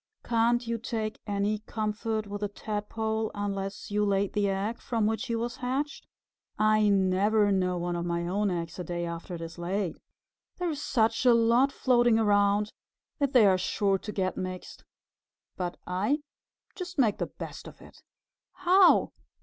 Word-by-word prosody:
"Can't 240 +1 +2
you 230 0 -2
take 220 -1 -4
any 205 +1 0
comfort 215 0 -3
with 205 0 -6
a 205 - 0
Tadpole 220 +1 -3
unless 200 -1 -4
you 210 0 +1
laid 200 -1 +1
the 205 -1 +1
egg 200 +4 -2
from 230 -3 0
which 220 +5 -1
he 230 - -1
was 235 +1 -3
hatched? 265 +4 -3 0.5
I 215 0 +4
never 200 +2 +3
know 180 -2 +1
one 175 0 -2
of 170 - -2
my 170 0 -1
own 200 +3 0
eggs 170 -1 -4
a - - -2
day 175 0 -3
after 170 +1 -6
it 165 - -8
is 165 +1 -8
laid. 185 0 -2 0.6
There 355 -1 -1
are - - -1
such 230 -6 +1
a 245 -2 +6
lot 235 +4 +4
floating 240 -4 +3
around 205 -1 +2 0.5
that 280 -2 0
they 245 -5 +7
are 190 -2 +4
sure 195 +1 +1
to 210 - -6
get 185 -2 -1
mixed. 185 -1 -6 0.7
But 180 -1 -4
I 210 +12 0 0.5
just 365 -3 -7
make 230 -7 +2
the - - -1
best - - -9
of - - -12
it." - - -16 0.5
"How?" 370 +1 +5
210 Hz, 170 wpm, -28 LUFS, 195-230 Hz, 0.7 s, they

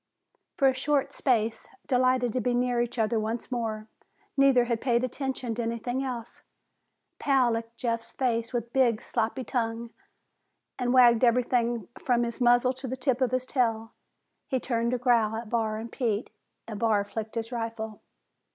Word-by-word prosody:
For 275 -5 +4
a 265 - +4
short 275 +2 0
space, 230 -4 0 0.2
delighted 255 -2 +2
to 255 - 0
be 245 +2 0
near 245 -1 +1
each 240 +1 -3
other 225 0 +1
once 225 +4 -3
more, 220 -3 -3 0.5
neither 275 -3 +5
had 235 -2 -1
paid 240 -2 +2
attention 255 -2 -3
to 235 - -3
anything 235 +3 -2
else. 240 -3 -6 0.8
Pal 265 -4 +3
licked 230 0 -4
Jeff's 230 -2 -2
face 235 -3 -1
with 240 -2 -1
a 235 - -32
big, 240 -4 +3
sloppy 230 +4 -1
tongue 230 -2 -2 0.9
and 245 -1 0
wagged 245 -2 +6
everything 240 -2 +2 0.2
from 240 -2 +2
his 235 +1 -4
muzzle 245 +1 +4
to 260 +1 -7
the 260 +1 -4
tip 260 -1 0
of 255 - +3
his 255 +1 -1
tail. 225 -4 0 0.5
He 260 - 0
turned 235 -2 -1
to 250 - 0
growl 235 -3 +2
at 225 -1 -6
Barr 220 -2 0
and 225 +1 -7
Pete, 225 -4 -2 0.4
and 215 -3 -6
Barr 220 -3 +2
flicked 220 +2 -6
his 230 +1 -3
rifle. 225 -2 -4
240 Hz, 170 wpm, -27 LUFS, 225-255 Hz, 0.9 s, wagged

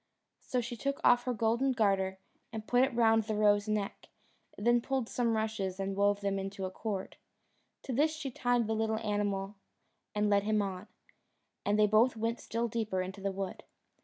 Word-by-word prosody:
So 250 - -1
she 240 +1 -5
took 275 +5 -2
off 245 0 +5
her 250 - 0
golden 235 +5 +2
garter 195 -5 +1 0.3
and 220 -2 -6
put 245 +2 +3
it 265 -2 0
round 225 -1 +4
the 215 -1 -2
roe's 205 0 +3
neck, 210 -2 -2 0.5
then 240 +3 +3
pulled 265 -2 -1
some 235 -2 0
rushes 210 -4 -2
and 195 0 -2
wove 200 0 +2
them 200 -1 0
into 195 0 -4
a 185 - -4
cord. 195 -1 -4 0.7
To 260 - -4
this 300 +6 +3
she 310 -4 -5
tied 245 -1 +1
the 220 - -1
little 220 0 0
animal 205 -2 -2 0.6
and 210 0 +2
led 200 -1 +4
him 215 +1 +1
on, 195 0 -3 0.8
and 205 +1 +1
they 215 - +6
both 225 +3 +4
went 230 +2 -1
still 230 +1 -2
deeper 215 -5 -1
into 190 +2 -7
the 195 0 -1
wood. 195 -1 -5
215 Hz, 190 wpm, -32 LUFS, 200-235 Hz, 0.8 s, they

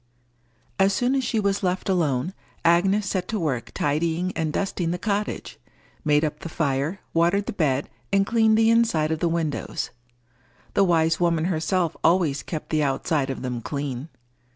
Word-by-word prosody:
As 195 +1 +4
soon 245 +5 +1
as 270 -1 +1
she 225 - 0
was 200 -1 0
left 185 -1 -1
alone, 165 -4 +1 0.3
Agnes 190 +5 +4
set 185 -2 -2
to 220 - -2
work 135 -8 -2
tidying 165 +5 0
and 160 -2 -1
dusting 180 -1 -1
the 175 - -1
cottage, 205 +2 -3 0.4
made 150 0 +3
up 150 0 -4
the 165 - -7
fire, 155 +3 -1
watered 175 +5 +2
the - - -4
bed, 145 -7 0 0.2
and 195 0 +3
cleaned 220 0 +3
the 225 0 +5
inside 220 -10 +2
of 160 - -1
the 170 - +1
windows: 165 -3 -2 0.8
the 200 - +4
wise 165 -2 +2
woman 170 -2 +2
herself 170 0 0
always 160 -5 +3
kept 155 -3 -6
the 155 -1 +2
outside 140 0 0
of 135 - -4
them 125 -2 -3
clean. 140 +1 -4
170 Hz, 170 wpm, -24 LUFS, 150-195 Hz, 0.8 s, the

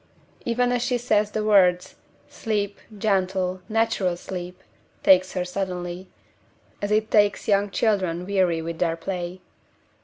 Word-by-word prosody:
Even 245 +1 +1
as 245 -1 0
she 245 0 0
says 215 -3 +1
the 215 0 -2
words, 185 -4 +3 0.3
sleep, 205 -2 -3 0.2
gentle, 185 -2 0
natural 215 -5 +1
sleep, 180 +1 -7 0.4
takes 185 0 +5
her 180 -1 -1
suddenly, 180 -1 -4 0.7
as 205 - -2
it 215 +1 +1
takes 205 -1 +3
young 200 0 +2
children 185 -5 0
weary 185 -4 +1
with 165 0 -5
their 165 -2 +1
play. 180 +1 -5
190 Hz, 130 wpm, -24 LUFS, 180-210 Hz, 0.7 s, takes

